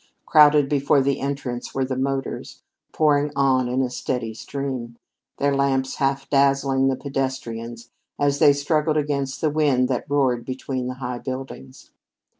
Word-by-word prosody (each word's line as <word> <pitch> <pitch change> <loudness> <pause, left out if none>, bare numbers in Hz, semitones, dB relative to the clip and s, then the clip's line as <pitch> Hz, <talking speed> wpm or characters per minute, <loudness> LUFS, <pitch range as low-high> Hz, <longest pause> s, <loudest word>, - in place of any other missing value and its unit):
Crowded 150 -2 +6
before 140 0 +2
the 140 +1 0
entrance 135 -3 -4
were 135 -1 +1
the 130 0 -3
motors, 135 0 -3 0.3
pouring 150 -1 +2
on 130 -2 +2
in 130 +2 0
a 125 - -1
steady 125 -3 -3
stream, 125 -1 -5 0.4
their 140 0 +1
lamps 135 -1 0
half 135 0 0
dazzling 135 -1 +2
the 135 - +1
pedestrians 120 -4 -5 0.3
as 140 0 +1
they 145 - +7
struggled 150 +2 0
against 140 -2 -2
the 155 - +1
wind 145 -5 +2
that 130 0 -2
roared 130 -4 +1
between 130 0 -4
the 125 - -4
high 125 -1 -5
buildings. 130 0 -8
135 Hz, 150 wpm, -23 LUFS, 130-140 Hz, 0.4 s, they